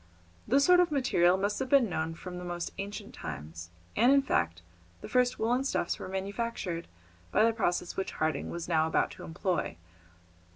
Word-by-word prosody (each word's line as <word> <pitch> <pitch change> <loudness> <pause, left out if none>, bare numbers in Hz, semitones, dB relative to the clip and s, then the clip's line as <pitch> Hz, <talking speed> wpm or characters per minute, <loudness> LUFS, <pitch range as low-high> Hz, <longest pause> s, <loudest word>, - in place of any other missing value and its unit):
This 275 +4 +4
sort 360 0 +6
of 355 -1 +4
material 190 -11 +3
must 205 +2 -1
have 260 -1 -2
been 275 -4 +5
known 165 -3 -2
from 180 +1 -7
the - - -7
most 175 -1 -4
ancient 205 +1 -6
times, 80 +3 -7 0.3
and, 245 - +5
in 275 0 +5
fact, 85 - 0 0.4
the - - -7
first 250 0 +2
woollen 245 +4 +1
stuffs 270 -10 -1
were - - -6
manufactured 190 -2 -3 0.4
by 215 - +4
the 230 - +3
process 180 -5 -1
which 190 - -3
Harding 155 0 -1
was 170 -1 -5
now 160 -2 +2
about 160 - +1
to - - -10
employ. 175 - -2
190 Hz, 180 wpm, -30 LUFS, 170-245 Hz, 0.4 s, sort